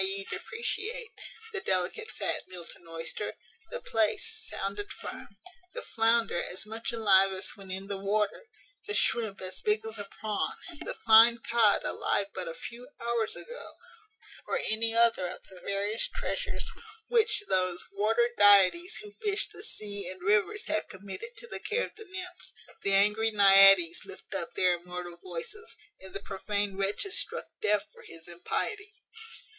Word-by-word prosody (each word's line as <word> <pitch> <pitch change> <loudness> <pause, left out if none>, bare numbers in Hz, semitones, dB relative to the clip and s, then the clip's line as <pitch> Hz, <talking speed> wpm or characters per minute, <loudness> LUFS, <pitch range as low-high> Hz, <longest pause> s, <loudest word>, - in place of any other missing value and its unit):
e._, 195 +1 -2
depreciate, 455 +1 -4 0.4
the 390 - -3
delicate 190 - 0
fat - - -1
Milton 175 -1 -8
oyster, 165 +5 -4 0.3
the - - -5
plaice 440 - -1
sound 195 +1 -4
and 205 - -6
firm, 255 -6 -9 0.4
the - - -5
flounder 225 -4 +2
as 185 +4 -4
much 225 +4 -4
alive 195 -4 +5
as 190 0 -3
when 195 -2 -13
in 190 +1 -4
the 200 -1 -4
water, 210 - -1 0.4
the 415 - -2
shrimp 220 -4 +1
as 185 0 -5
big 215 +1 +1
as 220 -1 -6
a 205 - -5
prawn, 215 -1 -1 0.3
the - - -4
fine 225 +2 +8
cod 230 -2 +3
alive 200 - 0
but 185 -2 -4
a 165 - -5
few 240 +8 -9
hours 235 -2 0
ago, 485 +1 -6 0.7
or - - 0
any 225 +1 +1
other 230 -5 +4
of 180 - -8
the 185 - -12
various 200 +3 -1
treasures - - -3 0.4
which 445 -3 +3
those 185 -1 +1
water 220 +4 +2
deities 205 - +6
who 420 - -10
fish 415 -1 -1
the - - -9
sea 205 -3 -3
and 185 -1 -8
rivers 210 - +2
have 215 - -1
committed 200 - -7
to - - -6
the - - -6
care 465 +3 -1
of - - -13
the 440 0 -11
nymphs, 365 -2 -8 0.3
the 200 - 0
angry 210 +3 +3
Naïades 195 -4 +7
lift - - -11
up 170 - -3
their 180 -1 +3
immortal 175 0 -7
voices, 185 - -7 0.2
and 190 -1 -10
the 195 - -3
prophane 205 0 -2
wretch 195 - +1
is 390 - +4
struck - - -2 0.2
deaf 210 -1 +2
for - - -16
his 165 0 -9
impiety. 415 - -3
210 Hz, 165 wpm, -29 LUFS, 190-240 Hz, 0.7 s, fine